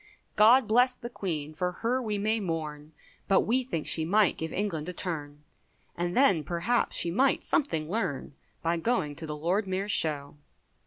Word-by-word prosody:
God 225 +3 +6
bless 245 +3 +4
the 240 -1 -9
Queen, 155 -8 -4
for 180 +3 -2
her 235 +7 -1
we 215 -4 -2
may 215 +2 0
mourn, 155 -5 -4 0.4
But 195 - +4
we 255 +4 +1
think 165 -11 -4
she 160 - +2
might 200 +3 +3
give 160 0 -5
England 180 -5 -3
a - - -5
turn, 150 -5 -5 0.5
And 175 +3 -2
then 195 - +4
perhaps 175 - 0
she 170 - +2
might 260 +9 +2
something 160 - 0
learn 165 -9 -3 0.3
By 170 +1 +1
going 165 -7 -1
to 160 - -6
the 150 0 -5
Lord 185 +7 0
Mayor's 190 +2 -2
show. 145 -4 +1
180 Hz, 175 wpm, -28 LUFS, 155-220 Hz, 0.5 s, God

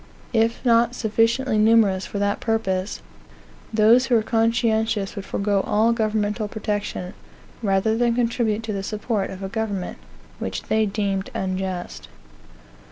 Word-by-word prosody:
If 230 +2 +1
not 235 0 +4
sufficiently 225 +1 +1
numerous 215 -4 +4
for - - -5
that 205 0 0
purpose, 200 -4 -1 0.7
those 230 +4 +5
who 245 - +3
were 220 - +3
conscientious 225 -2 +1
would 200 -1 -6
forego 200 -1 0
all 220 +4 +2
governmental 215 -1 -1
protection, 205 -3 -4 0.5
rather 200 +1 +1
than 235 0 +2
contribute 230 -2 0
to 220 -1 -3
the 195 - -2
support 210 0 -2
of 190 +1 -8
a - - -2
government 205 -3 -3 0.4
which - - -4
they 220 0 +1
deemed 195 -2 -2
unjust. 185 -1 -3
215 Hz, 135 wpm, -23 LUFS, 200-230 Hz, 0.7 s, those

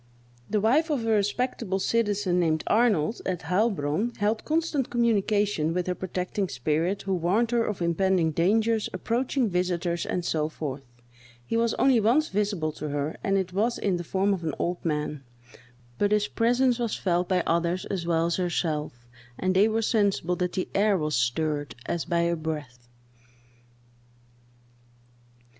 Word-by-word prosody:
The 215 - +1
wife 275 +10 +3
of 270 -7 -1
a 225 - +1
respectable 210 -1 0
citizen, 205 -3 +1
named 160 -3 +1
Arnold, 220 -4 +2
at 180 -3 -2
Heilbronn, 190 +2 0
held 215 +2 0
constant 310 -4 0
communications 205 -7 +1
with 180 -1 0
her 180 - -1
protecting 185 +1 -3
spirit, 155 +9 -1
who 195 - -1
warned 190 +7 +1
her 235 -1 +2
of 210 -5 -3
impending 170 -1 +2
dangers, 215 +7 +1
approaching 240 +6 0
visiters, 175 -2 -1
and 180 -1 -2
so 155 -2 0
forth. 145 -3 -5 0.6
He 230 - -3
was 230 0 +1
only 265 -3 +4
once 245 +9 +3
visible 200 -6 -1
to 150 - -3
her, 145 +1 -2
and 195 0 +2
it 185 -2 -2
was 225 +5 +1
in 190 -3 0
the 175 - -5
form 195 +4 +1
of 180 -3 -4
an 155 -3 -2
old 175 +1 -2
man; 150 -2 -2 0.8
but 205 0 +2
his 210 0 +2
presence 245 +1 +2
was 235 -3 -1
felt 175 -1 0
by 180 -2 +2
others 170 +2 0
as 190 -4 -3
well 165 -1 +2
as 170 - 0
herself, 155 -8 -2 0.3
and 185 0 0
they 200 +3 +5
were 225 +1 0
sensible 200 -6 +1
that 180 -1 -1
the 185 - -2
air 205 0 +3
was 155 -2 -1
stirred, 145 +5 -1
as 170 - -2
by 170 -1 +1
a 170 0 +1
breath. 150 -7 -6
185 Hz, 160 wpm, -26 LUFS, 165-220 Hz, 0.8 s, they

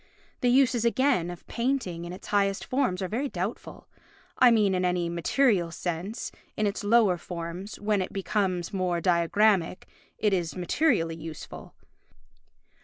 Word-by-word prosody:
The 245 - +2
uses, 250 -2 +3
again, 235 -7 +2
of 175 -1 -9
painting 235 -9 -2
in 175 - -6
its 185 - -10
highest 200 -1 +1
forms 250 -9 0
are - - -1
very 255 +8 -2
doubtful—I 210 +5 -2
mean 210 -4 +3
in 185 0 0
any 180 -1 0
material 175 +2 +2
sense; 175 +6 -4 0.3
in 215 - +1
its 205 +1 -2
lower 205 -4 +4
forms, 175 +4 -7
when 205 -1 +1
it 185 - -4
becomes 190 -3 -1
more 180 -3 0
diagrammatic, 180 +2 +2 0.3
it 210 -2 +1
is 175 -3 -1
materially 180 - +1
useful. 160 -2 -9
195 Hz, 140 wpm, -27 LUFS, 175-225 Hz, 0.3 s, lower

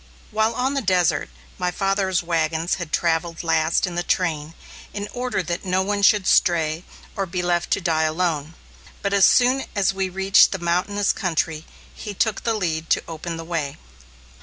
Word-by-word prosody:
While 220 +1 +1
on 260 +2 0
the 275 - 0
desert, 180 - +1 0.3
my 180 0 0
father's 190 0 0
wagons 165 0 0
had 165 -3 -6
travelled 165 0 0
last 160 +2 +2
in 180 - -5
the 175 - -1
train, 165 -3 -1 0.4
in 205 0 -4
order 250 -5 -2
that 170 +1 -4
no 185 0 +1
one 205 +1 -1
should 205 -1 +4
stray, 165 -2 +2 0.3
or 195 -1 -2
be 180 0 -3
left 175 -1 0
to - - 0
die 165 -3 +1
alone. 160 -1 -1 0.5
But 200 0 0
as 200 -1 +6
soon 255 +2 +3
as 195 -1 +2
we 190 -1 -2
reached 195 +2 +4
the - - -2
mountainous 185 +4 0
country, 160 -4 -2 0.3
he 210 -2 -7
took 215 +1 0
the 230 -1 0
lead 165 -5 -2
to - - +2
open 165 +1 -6
the 165 - -7
way. 160 -5 -3
180 Hz, 180 wpm, -22 LUFS, 165-200 Hz, 0.5 s, as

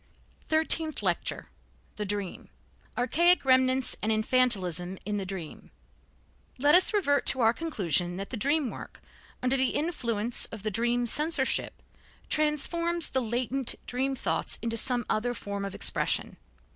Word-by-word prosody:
THIRTEENTH 315 -3 +1
LECTURE 175 -3 -2 0.5
THE 210 -1 -3
DREAM 200 -2 -3 0.5
Archaic 340 +7 +3
Remnants 260 0 +3
and 220 - 0
Infantilism 195 -6 +1
in 205 0 -2
the 195 -2 -4
Dream 185 -5 -8 0.9
Let 290 +3 +3
us 365 +1 +6
revert 285 -10 +1
to 260 - +3
our 225 0 +4
conclusion 185 - -1
that 195 +1 -6
the - - -3
dream 280 +3 0
work, - - -10 0.4
under 255 +1 +2
the 260 -1 +1
influence 240 -8 -1
of 220 -3 -10
the 215 - -2
dream 240 +3 0
censorship, 295 +2 0 0.5
transforms 335 +3 0
the 260 - 0
latent 245 +2 0
dream 265 +2 -2
thoughts - - -1
into 230 -1 -1
some 240 0 +3
other 245 +3 -1
form 200 -2 -5
of 195 -1 -5
expression. - - +1
245 Hz, 140 wpm, -28 LUFS, 210-285 Hz, 0.9 s, us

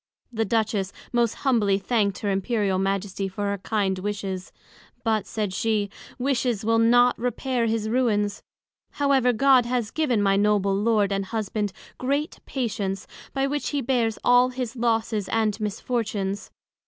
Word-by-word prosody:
The 225 0 0
Duchess 210 -2 0 0.2
most 235 -2 +2
humbly 215 -7 +3
thank'd 200 -1 0
her 205 - 0
Imperial 195 -1 0
Majesty 195 0 -1
for 200 +2 -2
her 200 - -3
kind 195 -2 -1
wishes; 195 -2 -4 0.5
but, 220 -4 0
said 210 -4 -2
she, 210 -1 0 0.3
Wishes 245 -4 0
will 225 0 +3
not 245 +2 +4
repair 245 0 -1
his 220 -1 0
ruins: 220 -4 +1 0.5
however, 275 -3 +3
God 255 0 +4
has 240 -3 -1
given 285 -8 +1
my 195 -1 +3
Noble 200 -1 +2
Lord 210 -1 +2
and 195 0 -1
Husband 210 -1 -2 0.3
great 280 +4 -1
Patience, 205 -7 -2 0.3
by 270 0 0
which 290 +1 -1
he 290 - -1
bears 230 -3 +1
all 245 +1 +5
his 250 -1 -4
losses 225 -4 0
and 220 -1 +1
misfortunes. 210 -2 -2
220 Hz, 145 wpm, -25 LUFS, 200-245 Hz, 0.5 s, all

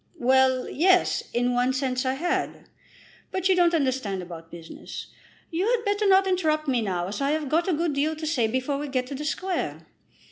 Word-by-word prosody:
"Well; 260 -1 +3
yes; 365 +4 +3
in 245 +1 +1
one 250 +1 +2
sense 260 -1 -1
I 260 - +1
had; 350 +6 -2 0.6
but 375 0 -1
you 380 - +4
don't 345 -1 +4
understand 255 - -1
about 165 -2 -10
business. 165 -1 -9 0.4
You 350 +5 0
had 470 -1 +1
better 410 0 +1
not 385 0 +5
interrupt 315 -5 0
me 250 -3 +1
now 180 -4 -2
as 205 +7 -5
I 275 - +1
have 310 -2 -2
got 330 +6 +1
a 370 - +2
good 325 0 0
deal 300 +3 0
to 315 0 -6
say 280 -8 +1
before 260 +4 -1
we 295 - -4
get 255 -2 -1
to 270 - -7
the 290 +2 -5
Square. 370 +4 -3
280 Hz, 205 wpm, -25 LUFS, 250-345 Hz, 0.6 s, not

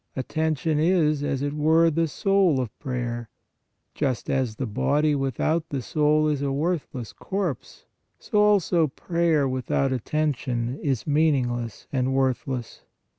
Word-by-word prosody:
Attention 155 +2 -1
is, 155 -3 +2
as 140 -1 -1
it 145 0 -2
were, 160 +2 +4
the 165 +2 +1
soul 190 -3 +2
of 125 -4 -4
prayer; 120 -4 -4 0.6
just 135 -5 -2
as 130 -5 0
the 130 - -3
body 145 +7 +1
without 145 +4 -1
the 140 - -2
soul 150 +3 +2
is 150 -2 0
a 140 -1 -1
worthless 140 -5 -2
corpse, 190 - -4 0.3
so 210 - -1
also 195 -6 +3
prayer 165 0 0
with 130 -1 -4
out 135 -1 +1
attention 130 -2 -1
is 135 -6 -1
meaningless 130 -7 0
and 130 0 0
worthless. 130 -2 -1
145 Hz, 135 wpm, -25 LUFS, 130-160 Hz, 0.6 s, were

